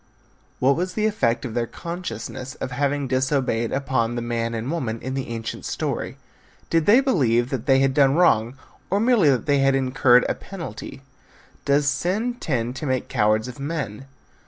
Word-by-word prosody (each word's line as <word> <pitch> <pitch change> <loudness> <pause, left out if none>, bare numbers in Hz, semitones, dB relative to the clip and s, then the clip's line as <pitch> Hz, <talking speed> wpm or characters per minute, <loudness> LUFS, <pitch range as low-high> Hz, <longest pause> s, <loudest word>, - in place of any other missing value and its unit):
What 135 +2 +3
was 180 +2 -3
the 215 - +1
effect 125 - 0
of 120 - -5
their 120 0 -1
consciousness 170 -6 -6
of - - -5
having 140 +1 -1
disobeyed 130 -3 0
upon 130 -4 0
the 120 - -3
man 115 0 -2
and 115 +5 -3
woman 120 -9 -2
in 130 +3 -5
the 135 -1 -3
ancient 115 -1 -5
story? - - -3 0.5
Did 165 -2 +2
they 230 +6 +7
believe 125 - +2
that 130 -3 -3
they 135 -1 +5
had 135 -1 +2
done 140 0 +4
wrong, 120 -8 +3 0.3
or 200 - +1
merely 225 - +4
that 130 -3 +1
they 145 -2 +2
had 135 0 +3
incurred 130 -2 +4
a - - 0
penalty? 140 - -8 0.6
Does 140 +1 +2
sin 185 - 0
tend 125 -4 -2
to 150 - -4
make 130 -1 -1
cowards 110 +2 +2
of 125 +2 -9
men? 140 -5 -4
135 Hz, 180 wpm, -23 LUFS, 120-150 Hz, 0.6 s, they